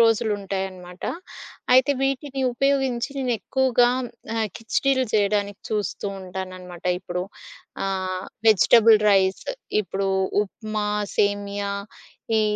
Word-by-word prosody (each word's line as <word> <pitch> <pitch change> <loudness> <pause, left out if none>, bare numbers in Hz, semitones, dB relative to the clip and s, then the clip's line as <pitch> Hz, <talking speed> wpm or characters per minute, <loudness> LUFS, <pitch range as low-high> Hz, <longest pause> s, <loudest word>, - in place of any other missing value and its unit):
రోజులుంటాయనమాట. 195 -5 0 0.7
అయితే 260 +2 +6
వీటిని 270 0 -1
ఉపయోగించి 270 -1 +1
నేనేక్కువగా 250 0 +2 0.5
ఆహ్, 220 -1 0
ఖిచిడిలు 260 +3 +1
చేయడానికి 205 -1 +1
చూస్తూ 210 -1 -2
ఉంటానన్నమాట. 185 -1 -8 0.2
ఇప్పుడు 180 -1 -3 0.6
ఆ! - - 0 0.6
వెజిటబుల్ 220 +1 +7
రైస్ 190 -1 +2 0.4
ఇప్పుడు 195 +1 -2 0.3
ఉప్మా, 215 0 -4 0.3
సేమియా 205 0 0 0.7
ఈ - - +3
210 Hz, 85 wpm, -24 LUFS, 195-240 Hz, 0.7 s, వెజిటబుల్